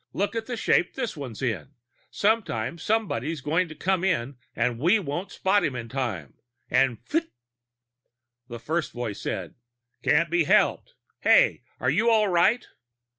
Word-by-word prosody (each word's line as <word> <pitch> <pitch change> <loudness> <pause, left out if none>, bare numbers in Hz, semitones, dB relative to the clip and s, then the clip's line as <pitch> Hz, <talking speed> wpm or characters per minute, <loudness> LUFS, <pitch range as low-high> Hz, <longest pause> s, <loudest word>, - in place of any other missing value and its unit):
Look 200 +3 -1
at 225 -1 -3
the 245 -2 -4
shape 175 - +2
this 245 -7 -3
one 140 -6 -6
is 110 - -8
in! 130 +3 -3 0.3
Some 220 +3 +2
time 120 - -4
somebody's 165 - -1
going 165 +6 0
to 155 - -10
come 190 +3 0
in 140 -8 0 0.2
and 120 0 0
we 175 - +4
won't 175 0 -4
spot 200 +2 +2
him 135 - -1
in 115 -2 -6
time 110 - -3 0.4
and 125 -3 +2
pfut!" 325 +2 -1 1.2
The 120 -2 -7
first 155 +4 -2
voice 120 -4 -4
said: - - -4 0.5
"Can't 160 +2 +2
be 170 -2 +2
helped. 210 - +2 0.2
Hey! - - +4 0.2
Are - - +1
you 230 +1 +3
all 215 -3 +4
right?" 190 +7 +3
165 Hz, 165 wpm, -26 LUFS, 125-205 Hz, 1.2 s, we